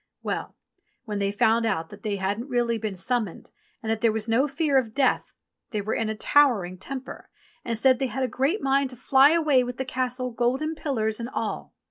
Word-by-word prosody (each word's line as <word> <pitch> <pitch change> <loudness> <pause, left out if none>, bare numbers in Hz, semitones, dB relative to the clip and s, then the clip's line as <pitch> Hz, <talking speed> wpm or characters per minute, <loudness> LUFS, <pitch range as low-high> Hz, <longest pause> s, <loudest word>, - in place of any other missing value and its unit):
Well! - - -3 0.5
when 210 -3 -3
they 200 0 0
found 220 +3 +3
out 190 -8 -1
that - - -12
they 210 -3 -2
hadn't 200 +6 -2
really 240 -2 +1
been 215 -2 -3
summoned 210 0 -2 0.3
and 220 - -1
that 220 -1 -1
there 230 - +4
was 220 0 -3
no 240 +6 +3
fear 285 -1 +2
of 225 -4 -5
death, 270 -2 +1 0.4
they 215 - -2
were 205 +2 -2
in 225 -1 -1
a 220 - -2
towering 215 -9 +3
temper 265 +5 -7 0.3
and 230 -2 -2
said 260 +2 +4
they 270 - 0
had 265 +1 -3
a - - +1
great 270 - 0
mind 275 0 +2
to 250 - -9
fly 265 +3 +5
away 300 -6 +3
with 245 0 -5
the 265 - -2
Castle, 255 0 -2
golden 255 +7 0
pillars 225 -8 -2
and 235 +1 -4
all. - - -4
245 Hz, 210 wpm, -25 LUFS, 220-265 Hz, 0.5 s, fly